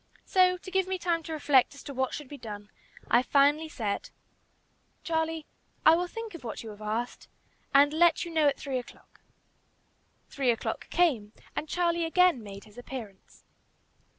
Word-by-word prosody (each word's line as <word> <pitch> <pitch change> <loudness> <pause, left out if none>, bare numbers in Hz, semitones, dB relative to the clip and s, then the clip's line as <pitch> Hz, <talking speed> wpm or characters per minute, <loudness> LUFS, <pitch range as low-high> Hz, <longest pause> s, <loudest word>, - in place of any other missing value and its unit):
So, 365 -1 +4
to 375 +1 -11
give 380 0 +1
me 375 0 -1
time 340 -2 0
to 325 - -8
reflect 290 -3 +3
as 280 - -12
to 280 - -7
what 260 -1 -1
should 295 -2 -6
be 290 - -9
done, 210 -2 -8 0.4
I 240 - +5
finally 290 +4 +3
said, 215 -8 -3 0.9
"Charlie, 320 -1 -1 0.4
I 315 - +9
will 355 +1 -1
think 455 +3 -7
of 335 - -9
what 230 -1 -6
you 220 - -7
have 210 0 -13
asked, 220 +3 -3 0.4
and 285 +2 +5
let 335 +1 +4
you 340 - -7
know 315 -2 +3
at 280 - +2
three 270 -3 -3
o'clock." 245 - -15 1.1
Three 270 -3 -1
o'clock 230 -2 -2
came, 245 -12 +1 0.2
and 305 - -3
Charlie 340 -1 +1
again 355 -5 +4
made 200 -2 -9
his 215 +2 -14
appearance. 230 -6 -9
290 Hz, 175 wpm, -29 LUFS, 240-340 Hz, 1.1 s, I